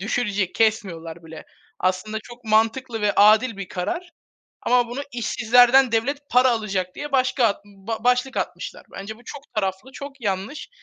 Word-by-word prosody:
Düşürecek, 205 Hz, -3 st, -1 dB
kesmiyorlar 170 Hz, -7 st, -1 dB
bile. 160 Hz, -1 st, -10 dB, 0.3 s
Aslında 185 Hz, +4 st, -1 dB
çok 240 Hz, +1 st, -13 dB
mantıklı 225 Hz, +2 st, +1 dB
ve 205 Hz, -1 st, +3 dB
adil 215 Hz, +2 st, +5 dB
bir 195 Hz, -2 st, -6 dB
karar 345 Hz, -, -4 dB, 0.5 s
ama 245 Hz, -1 st, +3 dB
bunu, 245 Hz, +3 st, -4 dB
"İşsizlerden 245 Hz, +2 st, +4 dB
devlet 260 Hz, +6 st, +1 dB
para 250 Hz, +1 st, +5 dB
alacak." 195 Hz, -6 st, -2 dB
diye 295 Hz, -1 st, -6 dB
başka 255 Hz, -5 st, +2 dB, 0.4 s
başlık 250 Hz, +3 st, +1 dB
atmışlar. -, -, -4 dB
Bence 210 Hz, +3 st, -7 dB
bu 240 Hz, -, -19 dB
çok 280 Hz, +2 st, -8 dB
taraflı, 195 Hz, +5 st, -2 dB
çok 280 Hz, -1 st, -9 dB
yanlış. 200 Hz, +7 st, -3 dB
225 Hz, 145 wpm, -23 LUFS, 200-250 Hz, 0.5 s, adil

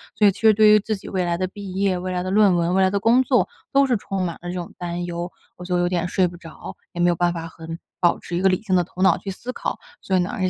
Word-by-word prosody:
所 210 Hz, -, +5 dB
以 -, -, +5 dB
其 195 Hz, -, -13 dB
实 220 Hz, -1 st, +6 dB
对 215 Hz, 0 st, +5 dB
于 210 Hz, 0 st, +7 dB
自 215 Hz, +1 st, -2 dB
己 195 Hz, -, -12 dB
未 185 Hz, -2 st, -1 dB
来 170 Hz, 0 st, 0 dB
的 185 Hz, +1 st, -1 dB
毕 195 Hz, 0 st, -9 dB
业、 195 Hz, -1 st, +1 dB
未 185 Hz, +1 st, -4 dB
来 180 Hz, 0 st, -1 dB
的 185 Hz, -, -3 dB
论 205 Hz, -1 st, +5 dB
文、 170 Hz, +1 st, +1 dB
未 190 Hz, -, +3 dB
来 190 Hz, -, +4 dB
的 200 Hz, -, 0 dB
工 230 Hz, +5 st, +4 dB
作 250 Hz, -2 st, +2 dB, 0.3 s
都 275 Hz, 0 st, +5 dB
是 250 Hz, -, +2 dB
充 195 Hz, -2 st, -3 dB
满 170 Hz, -2 st, -3 dB
了 175 Hz, -, -6 dB
这 -, -, -4 dB
种 175 Hz, -2 st, -6 dB
担 175 Hz, 0 st, -4 dB
忧， 175 Hz, 0 st, -5 dB, 0.3 s
我 180 Hz, -, -9 dB
就 180 Hz, 0 st, 0 dB
有 175 Hz, -, +2 dB
点 175 Hz, -1 st, -1 dB
睡 185 Hz, 0 st, +2 dB
不 175 Hz, -, -9 dB
着， 165 Hz, -2 st, -10 dB, 0.2 s
也 175 Hz, -, -7 dB
没 175 Hz, -, +4 dB
有 175 Hz, -, +2 dB
办 175 Hz, +1 st, +1 dB
法 165 Hz, -1 st, -5 dB
很 165 Hz, 0 st, -9 dB, 0.2 s
保 175 Hz, -1 st, +3 dB
持 175 Hz, -, -6 dB
一 -, -, -1 dB
个 190 Hz, -, +4 dB
理 185 Hz, -, 0 dB
性 190 Hz, -4 st, +1 dB
的 180 Hz, -, +3 dB
头 180 Hz, +2 st, -9 dB
脑 -, -, +5 dB
去 200 Hz, -, -7 dB
思 240 Hz, +6 st, -6 dB
考， -, -, -4 dB, 0.2 s
所 190 Hz, -, -1 dB
以 -, -, +3 dB
呢 180 Hz, +3 st, -2 dB
也 185 Hz, -1 st, +1 dB
185 Hz, 350 characters per minute, -22 LUFS, 175-200 Hz, 0.3 s, 于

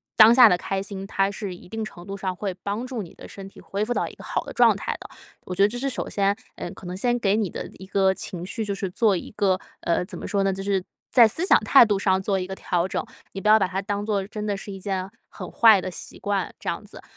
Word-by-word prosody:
当 220 Hz, +1 st, +9 dB
下 245 Hz, -1 st, +9 dB
的 180 Hz, -, +3 dB
开 195 Hz, +2 st, -3 dB
心， 195 Hz, -1 st, -7 dB
它 195 Hz, -1 st, +1 dB
是 200 Hz, -1 st, -5 dB
一 175 Hz, -, -15 dB
定 220 Hz, +4 st, -4 dB
程 175 Hz, -5 st, -9 dB
度 195 Hz, -, -5 dB
上 190 Hz, -1 st, -3 dB
会 190 Hz, +1 st, -4 dB
帮 205 Hz, +4 st, -3 dB
助 250 Hz, -4 st, -4 dB
你 175 Hz, -, -10 dB
的 -, -, -12 dB
身 195 Hz, -1 st, -9 dB
体 -, -, -16 dB
恢 200 Hz, +2 st, -3 dB
复 240 Hz, +3 st, -1 dB
到 -, -, -1 dB
一 -, -, -10 dB
个 -, -, -13 dB
好 -, -, -2 dB
的 -, -, -8 dB
状 -, -, +5 dB
态 -, -, -3 dB
的。 -, -, -10 dB, 0.4 s
我 185 Hz, -, -5 dB
觉 195 Hz, -, 0 dB
得 200 Hz, -, +7 dB
这 230 Hz, +4 st, -5 dB
是 275 Hz, +3 st, -1 dB
首 -, -, -4 dB
先， 200 Hz, 0 st, +1 dB, 0.2 s
呃， -, -, -6 dB
可 -, -, -12 dB
能 180 Hz, +1 st, -5 dB
先 240 Hz, +5 st, 0 dB
给 200 Hz, -3 st, +2 dB
你 215 Hz, -4 st, 0 dB
的 -, -, -6 dB
一 190 Hz, -, -9 dB
个 190 Hz, 0 st, +2 dB
情 180 Hz, -2 st, -6 dB
绪 220 Hz, +4 st, -3 dB
就 205 Hz, -1 st, -2 dB
是 195 Hz, -1 st, -3 dB
做 205 Hz, +1 st, +2 dB
一 -, -, -7 dB
个 190 Hz, -2 st, +2 dB, 0.2 s
呃， 170 Hz, +1 st, 0 dB
怎 180 Hz, -2 st, -8 dB
么 -, -, -7 dB
说 200 Hz, -, 0 dB
呢？ 195 Hz, 0 st, +1 dB
就 195 Hz, +1 st, -5 dB
是 195 Hz, -1 st, +1 dB, 0.3 s
在 240 Hz, -3 st, +8 dB
思 320 Hz, -, -2 dB
想 -, -, +6 dB
态 270 Hz, -, +7 dB
度 205 Hz, -3 st, 0 dB
上 190 Hz, -1 st, +2 dB
做 195 Hz, 0 st, 0 dB
一 185 Hz, -, -4 dB
个 190 Hz, -, -5 dB
调 175 Hz, -1 st, -1 dB
整， -, -, -3 dB, 0.3 s
你 195 Hz, -, -5 dB
不 210 Hz, -, -2 dB
要 215 Hz, +1 st, +7 dB
把 190 Hz, -, +2 dB
它 190 Hz, +1 st, -3 dB
当 205 Hz, 0 st, -3 dB
作 205 Hz, -3 st, 0 dB
真 210 Hz, +1 st, -6 dB
的 205 Hz, -1 st, -1 dB
是 200 Hz, -, -8 dB
一 195 Hz, -, -7 dB
件 190 Hz, -1 st, -3 dB, 0.2 s
很 -, -, -8 dB
坏 220 Hz, -3 st, +6 dB
的 185 Hz, -, -4 dB
习 180 Hz, -, -10 dB
惯， 200 Hz, -2 st, -2 dB
这 -, -, -4 dB
样 -, -, -3 dB
子。 -, -, -12 dB
195 Hz, 315 characters per minute, -24 LUFS, 190-215 Hz, 0.4 s, 当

